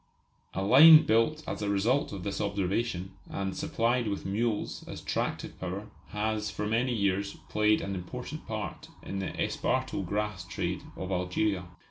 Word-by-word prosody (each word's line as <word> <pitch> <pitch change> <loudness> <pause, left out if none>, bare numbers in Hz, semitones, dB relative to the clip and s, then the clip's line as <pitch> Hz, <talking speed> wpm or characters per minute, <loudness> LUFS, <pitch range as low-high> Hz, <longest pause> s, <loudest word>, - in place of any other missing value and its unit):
A 95 - -1
line 155 +9 +9
built 135 +8 +2
as - - -4
a 105 - -1
result 110 +8 +2
of 95 -3 -6
this 100 +1 -3
observation, 100 -1 -1 0.2
and 95 -1 -3
supplied 120 +1 0
with 100 -1 -3
mules 105 +2 -1
as - - -6
tractive - - -3
power, 95 +3 -5 0.2
has 105 0 -1
for 105 - -4
many 115 +4 +1
years 100 -3 0
played 105 0 +3
an 100 - -3
important 90 -2 -6
part - - -5 0.2
in 95 - -4
the 95 - -2
esparto 130 -5 0
grass 105 0 -2
trade 85 - -3 0.2
of 95 0 -4
Algeria. 90 +1 0
105 Hz, 155 wpm, -29 LUFS, 95-115 Hz, 0.2 s, line